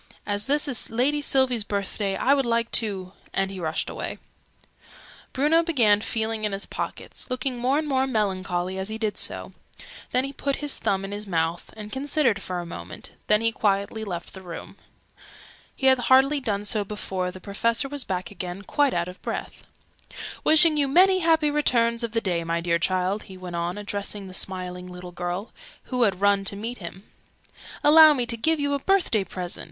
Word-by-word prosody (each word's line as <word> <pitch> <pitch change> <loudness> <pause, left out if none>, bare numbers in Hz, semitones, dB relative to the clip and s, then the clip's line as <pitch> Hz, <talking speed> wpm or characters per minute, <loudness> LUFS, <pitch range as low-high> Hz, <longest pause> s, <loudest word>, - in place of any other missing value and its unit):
As 205 0 -1
this 295 +2 +2
is 255 -5 0
Lady 265 +6 +1
Sylvie's 260 -5 +3
birthday, 200 -1 -2
I 270 - +3
would 280 -1 +2
like 235 -1 0
to 195 -5 +1
" - - -28
and 195 0 +1
he 190 - -7
rushed 160 -2 -2
away. - - -4 1.1
Bruno 300 +5 +3
began 235 -12 +3
feeling 220 0 -2
in 210 -2 -1
his 195 - -2
pockets, - - -6
looking 255 0 -2
more 255 +4 +2
and 310 0 -1
more 265 -1 +1
melancholy 190 -5 -1
as 190 +2 -2
he 220 - -3
did 215 -2 -1
so: - - -3 0.6
then 255 - +2
he 275 +1 -5
put 280 0 -1
his 295 -2 -2
thumb 195 0 0
in 195 - -7
his 205 +1 -5
mouth, 165 -1 -1
and 210 0 -8
considered 270 -6 +1
for 180 -2 -4
a 175 - -5
minute: 170 - -9 0.2
then 210 +1 +4
he 230 0 +2
quietly 205 +1 0
left 175 -5 -6
the 190 - -9
room. 175 -3 -9 1.0
He 265 - -4
had 260 -1 +6
hardly 265 +4 +4
done 210 -5 -2
so 210 0 0
before 190 -3 -3
the 185 +1 -9
Professor 230 +6 0
was 285 -1 -1
back 185 -2 -4
again, 185 0 -6
quite 285 +5 +1
out 170 0 0
of 180 +1 -10
breath. - - -5 0.8
"Wishing 315 0 +7
you 285 -1 +2
many 370 +6 +5
happy 320 -3 +3
returns 235 -5 +2
of 230 -1 -3
the 225 - +1
day, 175 -4 -1
my 165 0 -1
dear 170 0 +1
child!" 185 +3 0
he 190 - -9
went 180 -1 -7
on, 170 +2 -2
addressing 205 -1 -4
the 185 - -10
smiling 180 -1 -4
little 180 0 -9
girl, 175 +5 -4 0.4
who 250 - +1
had 195 -5 +2
run 200 -1 +3
to 200 - -2
meet 230 +4 -5
him. 185 +1 -9 0.8
"Allow 310 +1 +8
me 250 -3 0
to 235 0 +1
give 315 +7 +1
you 285 0 0
a 280 - 0
birthday 350 - +2
present. 180 -1 -5
210 Hz, 195 wpm, -25 LUFS, 190-265 Hz, 1.1 s, Allow